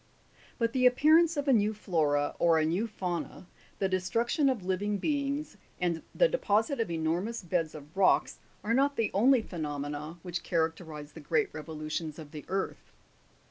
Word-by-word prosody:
But 230 Hz, -1 st, 0 dB
the 255 Hz, -1 st, +5 dB
appearance 310 Hz, +6 st, +5 dB
of 285 Hz, 0 st, -1 dB
a 270 Hz, -, +5 dB
new 215 Hz, -1 st, +2 dB
flora, 150 Hz, -8 st, 0 dB
or 165 Hz, -1 st, +4 dB
a 155 Hz, -, +2 dB
new 180 Hz, +8 st, 0 dB
fauna, 180 Hz, -5 st, -4 dB, 0.3 s
the 195 Hz, -, +1 dB
destruction 230 Hz, -, +1 dB
of 230 Hz, -9 st, -2 dB
living 200 Hz, +2 st, 0 dB
beings, 285 Hz, +3 st, -2 dB, 0.2 s
and 170 Hz, -2 st, 0 dB
the -, -, +5 dB
deposit 255 Hz, -, +1 dB
of 225 Hz, -, 0 dB
enormous 170 Hz, +8 st, -1 dB
beds 165 Hz, -3 st, -1 dB
of 150 Hz, +2 st, -12 dB
rocks, 190 Hz, -1 st, +3 dB, 0.2 s
are 220 Hz, +3 st, 0 dB
not 280 Hz, +3 st, +3 dB
the 225 Hz, -4 st, 0 dB
only 240 Hz, +4 st, +4 dB
phenomena 150 Hz, -1 st, -5 dB
which 175 Hz, -1 st, -4 dB
characterifb 160 Hz, -3 st, -2 dB
the -, -, -10 dB
great 160 Hz, +2 st, 0 dB
revolutions 155 Hz, 0 st, -5 dB
of 155 Hz, -3 st, -10 dB
the 150 Hz, -3 st, -8 dB
earth. 195 Hz, 0 st, -3 dB
185 Hz, 165 wpm, -30 LUFS, 160-235 Hz, 0.3 s, the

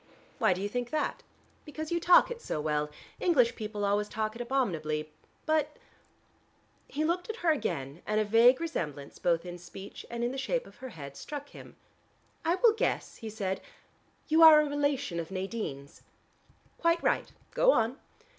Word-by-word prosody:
"Why -, -, +4 dB
do 185 Hz, +2 st, -5 dB
you -, -, 0 dB
think 245 Hz, +3 st, -3 dB
that?" 305 Hz, +2 st, -1 dB, 0.4 s
"Because 310 Hz, +1 st, -7 dB
you 340 Hz, -, +1 dB
talk 355 Hz, +7 st, +6 dB
it 475 Hz, -1 st, -6 dB
so 155 Hz, -, -3 dB
well. 150 Hz, 0 st, -1 dB, 0.3 s
English 250 Hz, -9 st, +3 dB
people 210 Hz, -2 st, -3 dB
always 205 Hz, +1 st, +1 dB
talk 215 Hz, 0 st, -2 dB
it 235 Hz, -, -7 dB
abominably. 160 Hz, -, -1 dB, 0.3 s
But 305 Hz, -1 st, +1 dB, 0.5 s
" -, -, -38 dB
He 310 Hz, -, +2 dB
looked 355 Hz, +4 st, -1 dB
at 445 Hz, -, -3 dB
her 330 Hz, -, +6 dB
again, 140 Hz, -, -3 dB
and 215 Hz, 0 st, +1 dB
a 215 Hz, -, +2 dB
vague 230 Hz, +4 st, +6 dB
resemblance 150 Hz, -, -4 dB
both 170 Hz, -1 st, +1 dB
in 175 Hz, 0 st, -7 dB
speech 190 Hz, +3 st, -10 dB
and 235 Hz, 0 st, -3 dB
in 240 Hz, -, 0 dB
the 265 Hz, -, -4 dB
shape -, -, -1 dB
of -, -, -16 dB
her 260 Hz, -1 st, -8 dB
head 140 Hz, -, -9 dB
struck 290 Hz, -, -7 dB
him. -, -, -13 dB, 0.7 s
"I 335 Hz, +2 st, +2 dB
will 450 Hz, +3 st, +5 dB
guess," 445 Hz, -, -2 dB
he 225 Hz, -, -7 dB
said, 195 Hz, -3 st, -3 dB, 0.7 s
"you 320 Hz, +1 st, +4 dB
are 320 Hz, -2 st, +10 dB
a -, -, 0 dB
relation 285 Hz, -9 st, -1 dB
of 165 Hz, -, -5 dB
Nadine's." 185 Hz, -8 st, -5 dB, 0.8 s
"Quite 335 Hz, 0 st, +2 dB
right: -, -, +1 dB, 0.2 s
go -, -, +5 dB
on." 235 Hz, -, +1 dB
235 Hz, 180 wpm, -30 LUFS, 185-310 Hz, 0.8 s, are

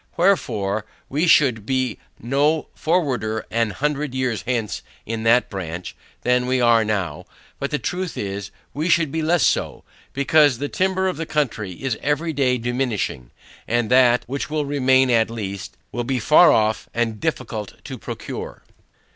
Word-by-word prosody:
Wherefore, 110 Hz, -, +1 dB, 0.2 s
we 150 Hz, +6 st, +1 dB
should 125 Hz, -9 st, +4 dB
be 130 Hz, 0 st, -1 dB, 0.2 s
no 145 Hz, +6 st, +1 dB
forwarder 130 Hz, -10 st, 0 dB
an 115 Hz, -1 st, +1 dB
hundred 145 Hz, +4 st, -2 dB
years 130 Hz, -4 st, -1 dB
hence 115 Hz, -7 st, -1 dB, 0.2 s
in 115 Hz, 0 st, -3 dB
that 120 Hz, +2 st, +4 dB
branch, 90 Hz, -2 st, -6 dB, 0.3 s
than 125 Hz, 0 st, +2 dB
we 130 Hz, 0 st, +1 dB
are 120 Hz, -2 st, +5 dB
now; 95 Hz, -8 st, -2 dB, 0.3 s
but 140 Hz, -, -2 dB
the 150 Hz, -, 0 dB
truth 180 Hz, +3 st, -3 dB
is, 100 Hz, -1 st, -4 dB, 0.2 s
we 155 Hz, +4 st, -1 dB
should 165 Hz, -4 st, +3 dB
be 160 Hz, -, -1 dB
less 170 Hz, +2 st, +2 dB
so, -, -, 0 dB, 0.3 s
because 140 Hz, -1 st, +4 dB
the 145 Hz, +3 st, -3 dB
timber 190 Hz, 0 st, 0 dB
of 185 Hz, -, -2 dB
the 165 Hz, 0 st, -4 dB
country 110 Hz, -10 st, -1 dB
is 130 Hz, +4 st, -3 dB
every 155 Hz, +3 st, 0 dB
day 130 Hz, -3 st, +2 dB
diminishing, 120 Hz, -, -2 dB, 0.4 s
and 120 Hz, -1 st, 0 dB
that, 125 Hz, -2 st, +5 dB
which 135 Hz, +5 st, -4 dB
will 150 Hz, -1 st, -1 dB
remain 130 Hz, -2 st, +3 dB
at 115 Hz, -2 st, +3 dB
last, 100 Hz, -4 st, -6 dB
will 120 Hz, +2 st, -2 dB
be 130 Hz, +2 st, -1 dB
far 155 Hz, +8 st, +6 dB
off 110 Hz, 0 st, +1 dB
and 115 Hz, -2 st, -1 dB
difficult 115 Hz, -10 st, -3 dB
to -, -, -7 dB
procure. -, -, -7 dB
125 Hz, 160 wpm, -22 LUFS, 110-150 Hz, 0.4 s, far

